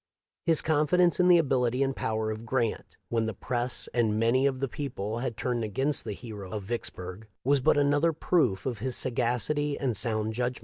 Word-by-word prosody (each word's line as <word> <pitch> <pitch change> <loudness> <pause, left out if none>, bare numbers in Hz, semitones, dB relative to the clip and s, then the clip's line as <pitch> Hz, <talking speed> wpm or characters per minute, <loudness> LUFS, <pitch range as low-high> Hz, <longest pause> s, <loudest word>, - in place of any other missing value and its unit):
His 165 -2 +4
confidence 160 +4 +3
in 180 - +5
the 175 -1 +7
ability 130 -4 +1
and 135 0 -1
power 110 0 -1
of 110 +1 -6
Grant, 115 -1 -2
when 115 -1 0
the 110 - -4
press 120 +4 -3
and 110 -3 +1
many 125 +4 +3
of 130 -2 -2
the 135 - -1
people 120 -6 -4
had 120 -3 -3
turned 120 -2 -1
against 135 +8 -1
the 105 - -3
hero 105 -4 -8
of 105 0 -5
Vicks 120 +4 -3
burg, 90 +4 -9 0.2
was 140 +2 +3
but 130 - +3
another 145 +3 +3
proof 150 - +1
of 120 -5 -3
his 125 +2 -2
sagacity 130 +5 0
and 130 -5 -1
sound 110 0 +2
judgment. 125 +2 -2
125 Hz, 195 wpm, -28 LUFS, 110-140 Hz, 0.2 s, the